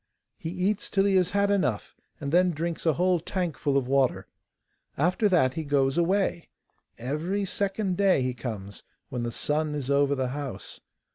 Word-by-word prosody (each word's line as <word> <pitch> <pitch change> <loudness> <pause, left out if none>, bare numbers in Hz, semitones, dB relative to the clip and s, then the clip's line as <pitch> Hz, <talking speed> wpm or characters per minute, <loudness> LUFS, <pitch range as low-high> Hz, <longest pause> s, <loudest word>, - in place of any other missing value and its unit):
He 160 - -4
eats 190 +4 -1
till 195 -1 +2
he 200 -1 +3
has 180 -1 +3
had 200 +1 +2
enough, 130 - 0 0.2
and 140 -2 -4
then 180 +2 +4
drinks 165 +2 -3
a 160 - +5
whole 180 +2 +2
tankful 160 -5 -1
of 130 -2 0
water. 135 -1 +2 0.7
After 185 - +2
that 145 -9 +3
he 160 - -3
goes 140 -2 +1
away. 175 0 +1 0.5
Every 160 - -2
second 195 -1 -1
day 195 -9 +3
he 125 0 -1
comes, 105 -5 -6 0.3
when 125 - -3
the 120 0 -2
sun 150 +4 -1
is 140 -2 -3
over 140 0 +3
the 130 -2 -1
house. 140 -1 -6
160 Hz, 170 wpm, -27 LUFS, 135-185 Hz, 0.7 s, a